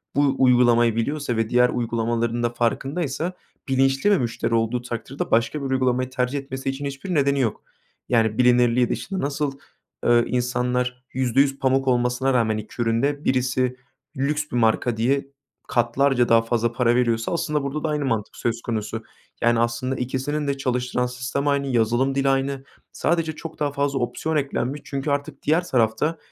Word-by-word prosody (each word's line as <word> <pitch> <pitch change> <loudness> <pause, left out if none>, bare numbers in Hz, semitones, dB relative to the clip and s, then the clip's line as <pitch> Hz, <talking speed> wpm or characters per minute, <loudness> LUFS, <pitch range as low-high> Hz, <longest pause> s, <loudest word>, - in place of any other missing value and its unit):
bu 140 -1 +3
uygulamayı 120 -3 +4
biliyorsa 135 +1 -1
ve 115 -1 0
diğer 125 0 +4
uygulamaların 115 0 -1
da 120 - +2
farkındaysa 140 +7 -1 0.3
bilinçli 135 +7 +2
bir 205 - +5
müşteri 120 -2 -2
olduğu 115 +2 +1
takdirde 120 +2 -5
başka 115 +6 +2
bir 135 - -3
uygulamayı 130 -1 +1
tercih 130 +1 -1
etmesi 135 -1 -5
için 135 +1 -4
hiçbir 140 +7 -4
nedeni 140 -2 +2
yok. 115 -5 -1 0.5
Yani, 110 -3 +2
bilinirliği 125 -1 +4
dışında. 195 -1 -3
Nasıl, 140 -1 -2 0.5
ııı, 120 0 +4
insanlar 125 0 -1
%100 135 +2 +2
pamuk 135 0 +1
olmasına 125 +1 +1
rağmen 110 -3 +2
2 110 +3 -6
ürün 115 0 +1
de 145 +1 -1
birisi 125 0 +1 0.4
lüks 150 +3 0
bir - - -3
marka 115 0 +2
diye 135 +5 +1 0.4
katlarca 120 +1 +2
daha 115 0 +6
fazla 115 0 0
para 120 0 +2
veriyorsa 115 0 +1
aslında 150 -4 -1
burada 140 +2 -3
da 160 - 0
aynı 150 -1 -1
mantık 110 -5 -2
söz 115 0 -2
konusu. 110 -1 -3 0.4
Yani, 120 0 +3
aslında 120 +3 0
ikisinin 135 +4 -2
de 140 0 -1
çalıştıran 125 -1 -1
sistem 125 +3 -3
aynı, 140 -1 +1
yazılım 120 +2 +1
dili 135 0 +2
aynı. 135 0 0 0.3
Sadece 165 -1 0
çok 160 +1 -9
daha 145 -1 0
fazla 140 -1 -1
opsiyon 155 +6 -2
eklenmiş 140 -1 -1
çünkü 140 +1 -3
artık 145 0 -3
diğer 160 +4 +2
tarafta 125 +7 +1
130 Hz, 165 wpm, -23 LUFS, 120-140 Hz, 0.5 s, daha